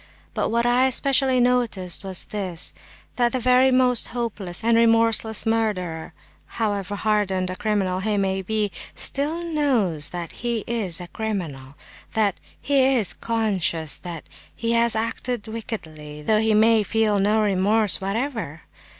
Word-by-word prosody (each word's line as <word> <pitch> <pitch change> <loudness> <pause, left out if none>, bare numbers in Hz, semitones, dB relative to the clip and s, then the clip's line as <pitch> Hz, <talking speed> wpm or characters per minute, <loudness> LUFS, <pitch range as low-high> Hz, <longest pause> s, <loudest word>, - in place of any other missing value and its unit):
But - - -1
what 235 +1 +1
I 245 +2 +4
especially 265 0 +2
noticed 240 -8 +1
was 190 -2 -1
this, 185 -5 -3 0.4
that 240 -1 +2
the 255 - 0
very 255 +2 +4
most 255 -2 +3
hopeless 220 -6 -4
and 230 0 +3
remorseless 230 -1 +3
murderer—however 205 0 -3
hardened 200 -3 0
a - - -5
criminal 200 -3 -1
he 210 +1 -1
may 190 -1 0
be—still 220 - -2
knows 250 - 0
that 175 -1 -6
he 235 -3 -3
is 205 -8 -1
a 175 - -7
criminal; 160 -12 -5 0.4
that 210 -3 +2
is, - - -30 0.2
he 270 -1 +3
is 210 -6 +2
conscious 195 -9 -1
that 170 -3 -7 0.3
he 230 0 -2
has 235 0 +2
acted 230 0 -3
wickedly, 155 -10 -7
though 215 +5 +2
he 220 0 +2
may 220 +1 +5
feel 215 -1 +1
no 210 +3 +2
remorse 205 +1 +2
whatever. 200 - -3
215 Hz, 140 wpm, -23 LUFS, 190-235 Hz, 0.4 s, may